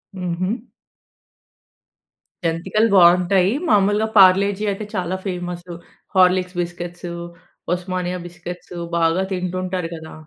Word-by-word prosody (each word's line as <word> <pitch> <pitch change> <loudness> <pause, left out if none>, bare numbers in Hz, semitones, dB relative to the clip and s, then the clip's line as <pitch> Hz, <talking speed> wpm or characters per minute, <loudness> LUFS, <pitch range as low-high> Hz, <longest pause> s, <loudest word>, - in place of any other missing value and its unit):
హుహు. 185 +5 -3 1.8
జంతికలు 190 +7 +1
బావుంటాయి. 180 +2 +5 0.2
మాములుగా 205 +1 +3
పార్లే-జీ 195 +2 +5
అయితే 205 +2 -5
చాలా 185 0 -1
famous. 175 -1 -5 0.4
Horlicks 185 0 +3
biscuits, 175 0 -6 0.6
Osmania 180 0 -3
biscuits 175 0 -9 0.2
బాగా 165 +3 +2
తింటుంటారు 185 -1 -3
కదా! 160 0 -10
180 Hz, 90 wpm, -21 LUFS, 175-190 Hz, 1.8 s, బావుంటాయి